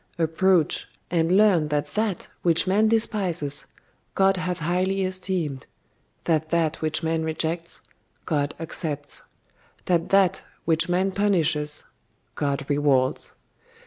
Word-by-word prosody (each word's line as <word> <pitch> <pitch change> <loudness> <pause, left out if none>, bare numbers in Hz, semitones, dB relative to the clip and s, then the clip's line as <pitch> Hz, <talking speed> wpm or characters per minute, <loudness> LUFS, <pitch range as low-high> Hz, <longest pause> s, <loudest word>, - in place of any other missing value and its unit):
Approach, 165 +1 +2 0.2
and 170 +2 +3
learn 195 -7 +4
that 150 0 -2
that 215 -4 -1
which 170 -1 +3
man 205 +4 +3
despises, 185 -10 0 0.5
God 195 0 +4
hath 180 -1 -2
highly 185 +4 0
esteemed; 185 -7 -3 0.6
that 160 -2 0
that 165 -1 0
which 155 +1 -1
man 160 0 0
rejects, 160 +1 -3 0.4
God 145 -3 -1
accepts; 155 -3 -4 0.6
that 170 -2 +1
that 195 -3 +3 0.2
which 165 +1 +1
man 185 +2 +1
punishes, 160 -7 +1 0.5
God 140 -1 -2
rewards. 140 -3 +1
165 Hz, 115 wpm, -24 LUFS, 150-185 Hz, 0.6 s, learn